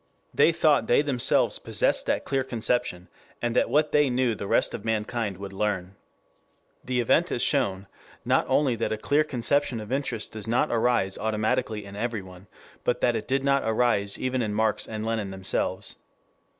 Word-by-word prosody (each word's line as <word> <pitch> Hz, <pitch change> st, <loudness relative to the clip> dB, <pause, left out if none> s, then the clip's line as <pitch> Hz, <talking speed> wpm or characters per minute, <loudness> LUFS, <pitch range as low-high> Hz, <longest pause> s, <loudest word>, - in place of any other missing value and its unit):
They -, -, +5 dB
thought 155 Hz, -7 st, +2 dB
they 120 Hz, -, +4 dB
themselves 130 Hz, -5 st, +2 dB
possessed -, -, +1 dB
that -, -, 0 dB
clear 135 Hz, -1 st, 0 dB
conception, 120 Hz, -7 st, -1 dB, 0.3 s
and 120 Hz, -1 st, -2 dB
that -, -, +2 dB
what 150 Hz, +1 st, +2 dB
they 150 Hz, -2 st, +3 dB
knew 125 Hz, -1 st, +1 dB
the 100 Hz, -, -6 dB
rest -, -, +2 dB
of -, -, -6 dB
mankind 110 Hz, -2 st, -2 dB
would 100 Hz, 0 st, -8 dB
learn. 95 Hz, -2 st, -2 dB, 0.9 s
The 125 Hz, 0 st, -1 dB
event 160 Hz, +9 st, +2 dB
has 120 Hz, -, 0 dB
shown, 100 Hz, -9 st, +1 dB, 0.4 s
not -, -, +2 dB
only 135 Hz, -5 st, +2 dB
that 115 Hz, -, -2 dB
a 110 Hz, -, -1 dB
clear 145 Hz, +7 st, +2 dB
conception 135 Hz, -2 st, 0 dB
of 105 Hz, +1 st, -8 dB
interest 135 Hz, -5 st, -2 dB
does 110 Hz, -1 st, -6 dB
not 120 Hz, +2 st, +1 dB
arise 115 Hz, -4 st, +1 dB
automatically 110 Hz, 0 st, -1 dB
in 100 Hz, 0 st, -10 dB
everyone, 100 Hz, -5 st, -5 dB, 0.4 s
but 120 Hz, -, 0 dB
that 120 Hz, -, +2 dB
it -, -, -4 dB
did 135 Hz, +1 st, 0 dB
not 140 Hz, 0 st, +2 dB
arise 110 Hz, -3 st, +1 dB
even 130 Hz, 0 st, -1 dB
in 105 Hz, -2 st, -2 dB
Marx 110 Hz, 0 st, +1 dB
and 110 Hz, -1 st, -5 dB
Lenin 110 Hz, -3 st, -2 dB
themselves. 95 Hz, -1 st, -2 dB
115 Hz, 175 wpm, -26 LUFS, 105-130 Hz, 0.9 s, They